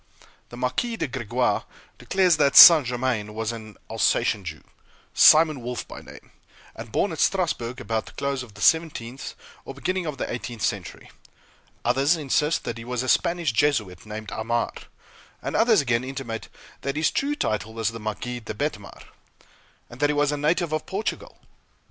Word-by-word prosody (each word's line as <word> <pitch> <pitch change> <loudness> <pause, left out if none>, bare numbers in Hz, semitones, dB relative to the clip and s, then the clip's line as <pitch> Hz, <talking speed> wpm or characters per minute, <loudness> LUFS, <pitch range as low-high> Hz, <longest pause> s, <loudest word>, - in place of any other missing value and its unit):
The 120 - -10
Marquis 130 - -2
de - - -2
Crequy 125 -1 -1 0.4
declares 185 -4 +2
that 140 -2 +2
St. 155 -7 +11
Germain 120 -4 -2
was 110 0 -2
an 110 -3 -10
Alsatian 100 - +1
Jew, 80 -3 -8 0.5
Simon 155 -3 +6
Wolff 125 +1 -5
by - - -10
name, - - -14 0.4
and 115 0 -9
born 200 - 0
at 160 - -6
Strasburg 145 -10 0
about 110 -1 -3
the - - -10
close 140 -1 -2
of 115 -6 -11
the - - -11
seventeenth 135 -6 0 0.3
or 135 - -9
the 140 - -14
beginning 185 -2 -1
of 150 -3 -4
the - - -3
eighteenth 120 -2 -6
century; - - -4 0.7
others 135 +7 +3
insist 150 +1 0
that 115 0 -5
he - - -8
was 125 +1 -3
a - - -5
Spanish 170 +1 +1
Jesuit 115 -8 0
named 110 0 -7
Aymar; 115 +2 -2 0.7
and - - -5
others 225 -6 +4
again 120 -3 0
intimate 130 -4 -6 0.3
that 140 0 -3
his 155 +1 +1
true 290 +1 -1
title 110 - -2
was 115 -1 0
the 115 0 -8
Marquis 115 +3 -4
de 110 -2 -7
Betmar, 105 -7 -5 0.8
and 120 - -13
that 145 +1 +2
he 150 - 0
was 145 0 +2
a - - -1
native 155 +2 0
of 155 - -3
Portugal. 200 +3 -4
130 Hz, 175 wpm, -24 LUFS, 115-155 Hz, 0.8 s, St